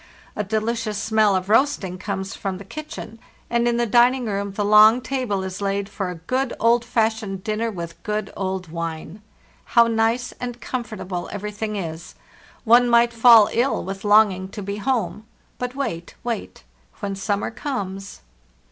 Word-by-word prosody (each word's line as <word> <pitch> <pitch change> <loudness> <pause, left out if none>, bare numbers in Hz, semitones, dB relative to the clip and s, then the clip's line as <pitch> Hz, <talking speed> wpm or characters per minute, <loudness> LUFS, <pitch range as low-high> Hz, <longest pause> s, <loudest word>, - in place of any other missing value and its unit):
A 210 - -1
delicious 220 +1 -2
smell 215 -1 +2
of 185 0 -1
roasting 215 -6 +1
comes 195 -1 -4
from 195 -2 -4
the 200 - -11
kitchen, 230 -3 -8 0.3
and 235 0 +2
in 235 0 +1
the 240 - +2
dining 245 +3 +4
room 200 -1 -2
the 205 +1 -1
long 215 +3 +7
table 250 -6 -2
is 190 +1 -6
laid 200 0 -1
for 195 -3 -4
a 180 - -5
good, 255 +10 -2
old 235 +1 +3
fashioned 220 -5 -1
dinner 220 +1 -1
with 170 -5 -7
good 210 -1 -3
old 190 -2 -3
wine. 165 +3 -5 0.6
How 235 - +9
nice 230 +2 0
and 245 -1 -5
comfortable 215 -8 -5
everything 210 +1 -4
is! 165 -4 -6 0.5
One 240 +1 +5
might 235 0 +4
fall 230 -2 +7
ill 250 +4 +1
with 195 +1 -6
longing 205 -3 +4
to 205 0 -7
be 200 +1 -4
home. 215 -5 -1 0.4
But 250 +1 -4
wait, 170 -12 -4
wait; 235 -3 -5 0.4
when 200 -2 -3
summer 200 +2 -2
comes. 200 - -5
210 Hz, 160 wpm, -22 LUFS, 195-235 Hz, 0.6 s, How